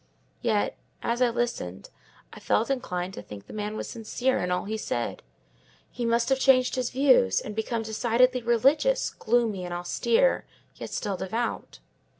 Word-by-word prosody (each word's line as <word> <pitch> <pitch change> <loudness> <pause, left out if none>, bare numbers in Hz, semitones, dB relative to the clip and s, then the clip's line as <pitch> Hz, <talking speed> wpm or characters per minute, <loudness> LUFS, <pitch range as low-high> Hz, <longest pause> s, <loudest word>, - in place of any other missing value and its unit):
Yet, 220 -4 +1 0.3
as 235 +2 -1
I 250 - +5
listened, 230 - -3 0.4
I - - -10
felt 230 +5 +1
inclined 180 -8 -2
to - - -7
think 105 -1 -10
the - - -12
man 210 0 -3
was - - -4
sincere 245 +3 -1
in 180 - -1
all 180 +1 -1
he 215 +2 -3
said: 120 - -3 0.7
he 245 - -3
must 235 +1 +2
have 265 0 +2
changed 255 -2 +4
his 255 -2 -1
views, 260 - +4
and 210 - -7
become 225 +1 -2
decidedly 240 +3 +2
religious, 275 - +2
gloomy 225 -5 0
and 175 -1 -4
austere, 230 - +1 0.3
yet - - -8
still 200 -3 -3
devout. 225 +6 -3
230 Hz, 160 wpm, -27 LUFS, 205-250 Hz, 0.7 s, I